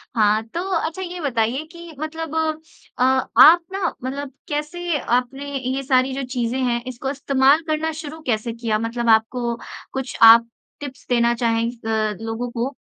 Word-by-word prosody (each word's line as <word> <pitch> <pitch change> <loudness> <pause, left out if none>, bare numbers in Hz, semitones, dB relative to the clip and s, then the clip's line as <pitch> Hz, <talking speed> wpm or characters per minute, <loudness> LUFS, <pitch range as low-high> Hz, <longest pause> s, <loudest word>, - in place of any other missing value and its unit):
हाँ, 215 -1 +3
तो 230 +10 -5 0.2
अच्छा 330 +4 -3
ये 360 -1 -6
बताइए 250 -1 0
कि 340 -2 -11
मतलब 320 0 -5
अ, 315 -4 -3
आप 265 +5 +6
न 385 -3 -1
मतलब 270 +1 -4 0.2
कैसे 320 +2 -2
आपने 260 +4 -2
ये 260 +1 -3
सारी 260 0 +2
जो 275 - -3
चीज़ें 250 -1 -2
हैं 240 -1 0
इसको 255 +1 -4
इस्तेमाल 275 +1 +3
करना 310 +1 -1
शुरू 315 0 -8
कैसे 230 0 -1
किया? 225 -2 -1
मतलब 230 +1 -2
आपको 235 +2 +2 0.4
कुछ 265 -1 -4
आप 230 +1 +9 0.3
टिप्स 285 -3 -9
देना 235 -1 +3
चाहें 230 -1 0
अ, 220 -2 -2
लोगों 225 +2 -4
को? 245 +4 -3
260 Hz, 160 wpm, -21 LUFS, 235-305 Hz, 0.4 s, आप